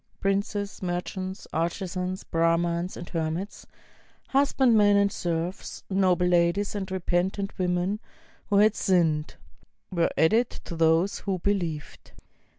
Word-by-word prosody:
Princes, 200 +1 -1
merchants, 185 +1 -4
artisans, 180 +3 -2
Brahmans 170 +2 0
and 175 - -7
hermits, 165 +4 -4 0.6
husbandmen 240 -7 +4
and 200 0 +3
serfs, 170 +1 -4
noble 185 -2 +3
ladies 180 +3 +2
and 200 -2 -4
repentant 190 +2 -1
women 180 +3 0 0.5
who 205 - 0
had 210 +1 +5
sinned, 165 -7 +1 0.6
were 170 -2 +2
added 225 +9 +3
to 170 - -9
those 165 +4 +2
who 195 -2 -2
believed. 175 -5 -3
185 Hz, 110 wpm, -26 LUFS, 170-200 Hz, 0.6 s, had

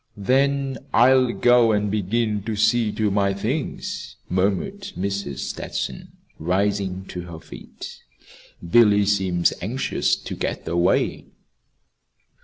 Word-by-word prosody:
"Then 135 +5 +1 0.2
I'll 130 +1 +5
go 120 -1 +4
and 105 -1 0
begin 105 +1 0
to 110 -1 -2
see 110 +1 +2
to 105 -2 0
my 100 -1 +1
things," 100 - -4
murmured 100 - 0 0.2
Mrs. 100 -7 -3
Stetson, - - -4 0.3
rising 95 +2 -1
to 90 - -5
her 80 - -8
feet. - - -11 0.7
"Billy 105 0 +5
seems 95 -4 +2
anxious 120 +9 0
to - - -7
get - - -4
away." 85 +1 +1
105 Hz, 110 wpm, -23 LUFS, 95-120 Hz, 0.7 s, I'll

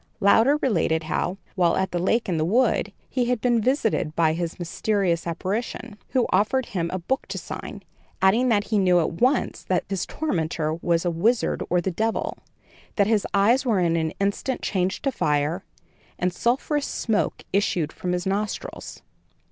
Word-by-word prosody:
Louder 225 +7 +5
related 165 -9 +1
how, 170 +4 -2 0.2
while 175 -3 +2
at 190 0 0
the 175 - -1
lake 225 +6 +1
in 175 -4 0
the 155 - +1
wood, 215 +2 +2 0.2
he 250 -2 0
had 245 -1 0
been 240 -1 +2
visited 220 - 0
by 160 -2 +3
this 170 0 -3
mysterious 175 0 -1
apparition, 205 +6 -3
who 255 -3 +2
offered 215 +7 +2
him 170 -4 -2
a 185 - -1
book 260 - -2
to - - -5
sign, - - -7 0.4
adding 225 +7 +4
that 205 -3 +3
he 210 0 0
knew 180 -2 +4
at 165 +2 -2
once 255 +2 +2
that 185 - 0
his 195 -2 -2
tormentor 160 - -1
was 170 +1 0
a 175 - +2
wizard 220 +9 +1
or 180 - +3
the 190 - -1
Devil, 220 +6 -2 0.6
that 200 - +3
his 215 -1 +1
eyes 230 +7 +4
were 230 -7 +2
in 170 -2 +2
an 160 -1 0
instant 200 +6 -1
changed 185 -1 -1
to 275 - +1
fire, 150 - 0 0.5
and 180 0 0
sulphurous 275 +7 0
smoke 220 -3 -1
issued 180 -6 +1
from 180 - -3
his 180 0 -1
nostrils. 200 +2 -4
195 Hz, 175 wpm, -24 LUFS, 170-230 Hz, 0.6 s, Louder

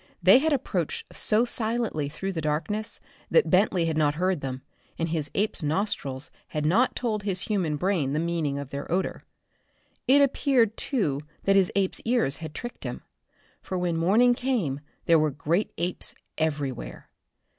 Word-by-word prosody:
They 190 +8 +8
had 315 +3 +1
approached 200 - -2
so 220 +3 +2
silently 225 -10 -1
through 195 +6 -4
the 165 - -3
darkness 160 +9 -2 0.3
that 480 - +3
Bentley 185 -2 +3
had 160 -1 -1
not 150 -1 +2
heard 180 -1 0
them, 130 -1 -5 0.3
and 165 0 -1
his 155 -3 -2
ape's 210 -1 0
nostrils 150 -5 -2 0.2
had 150 -1 -3
not 220 +11 +3
told 220 -4 -1
his 195 -3 -1
human 185 -8 0
brain 165 -6 0
the - - 0
meaning 165 -4 -1
of 140 -1 -6
their 140 +2 -5
odor. 185 +2 -1 0.8
It 280 +2 +7
appeared 255 -5 +2
too 155 - 0 0.2
that 195 - +3
his 190 -2 +4
ape's 195 -2 0
ears 225 - +1
had 160 -2 -8
tricked 240 0 -7
him. - - -5 0.6
For 185 - -4
when 175 -2 0
morning 210 +9 +4
came 235 - -1 0.3
there 165 -1 +5
were 155 0 +2
great 160 +7 -1
apes 175 +1 -4 0.2
everywhere. 145 -5 -3
180 Hz, 165 wpm, -26 LUFS, 150-215 Hz, 0.8 s, They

